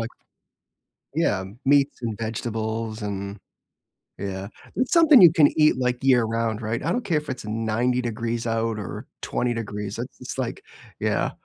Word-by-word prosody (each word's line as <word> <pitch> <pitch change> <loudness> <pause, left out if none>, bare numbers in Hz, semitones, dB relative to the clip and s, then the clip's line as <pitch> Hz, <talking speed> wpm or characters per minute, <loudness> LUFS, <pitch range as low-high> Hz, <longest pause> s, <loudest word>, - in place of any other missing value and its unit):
like 115 +1 -3 1.1
Yeah, 105 - +1 0.2
meats 140 -1 +3
and 115 -4 -3
vegetables, 110 0 -3
and 100 -1 -4 0.8
Yeah, 95 0 -4 0.3
it's 255 0 0
something 325 - +8
you 175 -4 +10
can 155 -3 +6
eat, 150 -2 +5
like, 125 0 -1
year 125 -3 +5
round, 115 0 -1
right? 115 +1 -2
I 165 - +1
don't 245 +6 0
care 165 -4 +1
if 150 - -4
it's 125 -4 -5
90 115 +3 0
degrees 115 0 -3
out 115 -1 0
or 100 - -6
20 120 -1 -1
degrees, 105 -2 -4
it's 125 +1 -6
just - - -7
like, - - -3 0.4
yeah. - - 0
115 Hz, 165 wpm, -24 LUFS, 110-130 Hz, 1.1 s, you